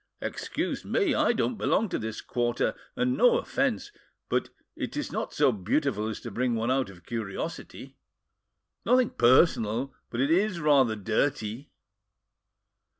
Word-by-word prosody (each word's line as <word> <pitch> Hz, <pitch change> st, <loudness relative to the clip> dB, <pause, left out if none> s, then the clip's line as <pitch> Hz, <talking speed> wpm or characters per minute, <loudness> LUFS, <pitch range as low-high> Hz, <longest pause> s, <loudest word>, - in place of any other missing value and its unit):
"Excuse -, -, -3 dB
me! 385 Hz, -9 st, +1 dB
I -, -, +3 dB
don't 235 Hz, -1 st, -1 dB
belong 225 Hz, -, +2 dB
to -, -, -2 dB
this 110 Hz, 0 st, -5 dB
quarter, 120 Hz, -1 st, 0 dB, 0.2 s
and—no 260 Hz, -, +3 dB
offence—but 420 Hz, -4 st, -3 dB, 0.3 s
it -, -, -5 dB
is -, -, -3 dB
not -, -, -3 dB
so -, -, +3 dB
beautiful 110 Hz, +2 st, -1 dB
as 110 Hz, -, -4 dB
to 120 Hz, -, -7 dB
bring 120 Hz, +3 st, 0 dB
one 115 Hz, +2 st, 0 dB
out 130 Hz, -4 st, +1 dB
of 90 Hz, -3 st, -15 dB
curiosity! 110 Hz, -5 st, -6 dB, 0.9 s
Nothing 250 Hz, +1 st, +3 dB
personal—but 120 Hz, -2 st, +2 dB
it 140 Hz, +4 st, +2 dB
is 185 Hz, +1 st, +2 dB
rather 140 Hz, -7 st, +4 dB
dirty." 110 Hz, +3 st, -1 dB
130 Hz, 130 wpm, -27 LUFS, 110-185 Hz, 0.9 s, rather